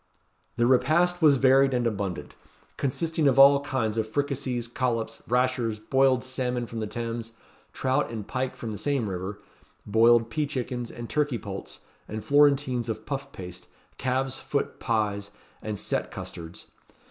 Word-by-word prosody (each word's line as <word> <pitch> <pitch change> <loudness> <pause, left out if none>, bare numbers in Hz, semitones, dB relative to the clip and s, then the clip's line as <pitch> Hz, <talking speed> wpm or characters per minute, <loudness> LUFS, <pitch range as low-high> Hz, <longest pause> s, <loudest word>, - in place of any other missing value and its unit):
The 120 0 +2
repast 155 +8 +3
was 150 -3 +7
varied 135 0 +4
and 120 -1 0
abundant, 100 -5 -3 0.4
consisting 160 +3 0
of 135 -1 +3
all 140 +1 +8
kinds 115 -6 -1
of 110 - -1
fricassees, 135 -3 -2
collops 115 -2 -2
and - - -19
rashers, 125 -3 +1
boiled 130 +3 +2
salmon 125 -2 -2
from 115 0 -6
the 110 - -2
Thames, 115 0 -5 0.4
trout 130 +2 0
and 110 -3 -6
pike 130 0 -2
from 115 - -5
the 105 - -5
same 140 -3 0
river, 95 +2 -4 0.5
boiled 115 +2 +4
pea 150 +1 0
chickens, 125 -3 -4
and 120 0 -7
turkey 145 -3 0
poults, 100 -3 -7 0.3
and 110 0 -6
florentines 140 -3 +3
of 110 -1 -4
puff 140 -1 -4
paste, 90 -3 -9 0.3
calves 130 +1 -1
foot 140 - -2
pies, 105 -3 -1 0.3
and 105 -1 -4
set - - -2
custards. 80 0 -8
125 Hz, 155 wpm, -27 LUFS, 110-135 Hz, 0.5 s, all